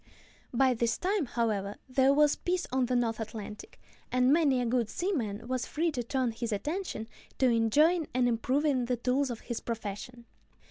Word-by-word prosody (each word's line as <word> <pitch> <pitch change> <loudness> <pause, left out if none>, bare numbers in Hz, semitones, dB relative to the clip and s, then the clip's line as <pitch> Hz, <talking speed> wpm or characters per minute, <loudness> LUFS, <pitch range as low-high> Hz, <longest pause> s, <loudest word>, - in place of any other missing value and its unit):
By 260 +1 +3
this 235 -1 0
time, 375 -5 0
however, 210 -4 -1
there 265 +1 +3
was 295 +1 +4
peace 360 0 -1
on 255 -1 +1
the 250 - 0
North 230 -2 0
Atlantic, 215 - -7 0.3
and 255 +2 +4
many 295 -5 +3
a 245 - 0
good 235 -2 +1
seaman 235 - -2
was 255 -1 -2
free 330 +2 0
to 255 -5 -2
turn 250 0 -1
his 230 0 -4
attention 295 - -3 0.3
to 260 - +4
enjoying 295 +9 +3
and 250 0 +2
improving 255 +3 +1
the 245 0 -1
tools 255 +3 +1
of 235 -2 -5
his 235 -2 -4
profession. 230 +2 -6
250 Hz, 175 wpm, -30 LUFS, 230-285 Hz, 0.3 s, was